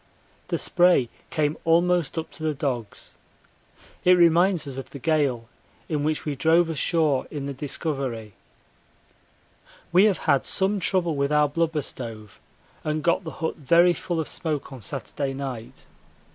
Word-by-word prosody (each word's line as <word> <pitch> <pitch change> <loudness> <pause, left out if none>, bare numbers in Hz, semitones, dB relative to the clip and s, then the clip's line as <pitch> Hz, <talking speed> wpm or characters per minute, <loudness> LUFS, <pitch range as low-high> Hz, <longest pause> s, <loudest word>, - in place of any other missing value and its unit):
The - - -1
spray 175 -9 +3 0.2
came 150 0 0
almost 170 -1 +2
up 160 - -4
to - - -14
the 155 -1 -1
dogs. 125 -6 -4 0.9
It 180 - +6
reminds 175 0 +4
us 135 -2 -7
of 135 - -7
the - - -9
gale 140 -5 0 0.4
in 150 -3 -1
which 155 0 -1
we 150 - -1
drove 165 +4 +3
ashore 155 -3 +1
in 145 -3 -5
the 140 - -4
Discovery. 135 -6 -4 1.6
We 185 +4 +6
have 205 -4 +3
had 140 -4 +3
some 195 +2 0
trouble 180 -3 +1
with 140 +1 0
our 150 0 +4
blubber 160 0 -1
stove 110 -6 -8 0.4
and 155 0 -2
got 170 +2 +2
the - - -4 0.2
hut - - -2
very 170 +4 +4
full 170 0 -3
of 160 - -2
smoke 155 -4 -3
on 130 - -9
Saturday 135 +3 -4
night. 130 -5 -7
150 Hz, 155 wpm, -25 LUFS, 135-170 Hz, 1.6 s, It